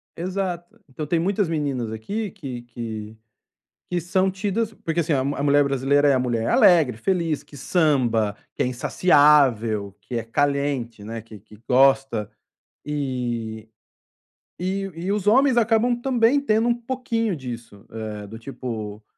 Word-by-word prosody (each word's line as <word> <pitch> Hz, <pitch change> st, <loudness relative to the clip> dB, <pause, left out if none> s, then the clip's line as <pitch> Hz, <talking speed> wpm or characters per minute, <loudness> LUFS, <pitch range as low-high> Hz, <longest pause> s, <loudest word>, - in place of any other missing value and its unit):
Exato, 180 Hz, -1 st, -4 dB
então, 150 Hz, +3 st, -5 dB
tem 165 Hz, +2 st, +1 dB
muitas 195 Hz, +2 st, +1 dB
meninas 140 Hz, -8 st, -2 dB
aqui 200 Hz, -, -4 dB
que 135 Hz, -, -7 dB
que, 110 Hz, -2 st, -7 dB, 0.7 s
que 180 Hz, -, 0 dB
são 185 Hz, +3 st, +1 dB
tidas, 210 Hz, +3 st, -2 dB
porque, 165 Hz, -4 st, -3 dB
assim, 160 Hz, 0 st, 0 dB, 0.3 s
mulher 145 Hz, 0 st, +4 dB
brasileira 140 Hz, +1 st, +2 dB
é 140 Hz, -, +5 dB
a 130 Hz, -, +2 dB
mulher 115 Hz, -2 st, -1 dB
alegre, 160 Hz, -9 st, +5 dB
feliz, 165 Hz, -2 st, -1 dB
que 145 Hz, -1 st, -14 dB
samba, 125 Hz, -, +1 dB, 0.2 s
que -, -, -1 dB
é -, -, 0 dB
insaciável, 125 Hz, -, +3 dB
que 125 Hz, -, -7 dB
é 115 Hz, -, -1 dB
caliente, 140 Hz, -2 st, -1 dB, 0.2 s
que 110 Hz, -2 st, -12 dB
que 105 Hz, +1 st, -17 dB
gosta. 135 Hz, -4 st, +3 dB, 0.6 s
E, 120 Hz, -6 st, -3 dB, 0.9 s
e 190 Hz, +2 st, -2 dB
e 180 Hz, +4 st, -3 dB
os 210 Hz, -1 st, -1 dB
homens 260 Hz, +3 st, +5 dB
acabam, 230 Hz, +1 st, +3 dB
também, 245 Hz, +1 st, +3 dB
tendo 225 Hz, -4 st, +1 dB
um 240 Hz, -, +4 dB
pouquinho 235 Hz, -4 st, -2 dB
disso, 120 Hz, -6 st, -9 dB, 0.4 s
do 115 Hz, -, -8 dB
tipo 110 Hz, -5 st, -6 dB
145 Hz, 140 wpm, -23 LUFS, 120-190 Hz, 0.9 s, é